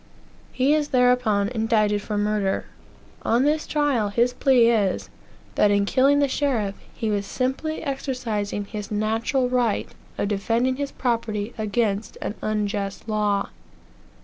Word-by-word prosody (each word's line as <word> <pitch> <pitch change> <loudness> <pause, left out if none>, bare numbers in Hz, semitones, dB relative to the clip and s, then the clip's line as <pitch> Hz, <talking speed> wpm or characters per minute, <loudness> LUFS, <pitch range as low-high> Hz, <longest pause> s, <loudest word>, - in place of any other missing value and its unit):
He 270 +3 +2
is 305 -1 +1
thereupon 250 -6 +3
indicted 220 -3 +1
for 210 0 -3
murder. 205 -2 0 0.6
On 235 +3 +2
this 300 +2 +1
trial 285 -8 +1
his 240 +4 +2
plea 250 -3 +4
is, 205 -5 0 0.4
that 210 - +3
in 200 0 +3
killing 270 +6 +3
the 285 -1 +3
sheriff, 255 -8 0 0.2
he 220 -2 -3
was 200 -1 -1
simply 265 +8 -2
exercising 240 -8 -3
his 210 0 -6
natural 225 +5 0
right 245 -4 0 0.3
of - - 0
defending 230 +5 0
his 280 -1 -3
property 230 -3 -2
against 215 -1 -1
an - - -3
unjust 205 -1 -2
law. 210 -2 0
225 Hz, 135 wpm, -24 LUFS, 205-255 Hz, 0.6 s, plea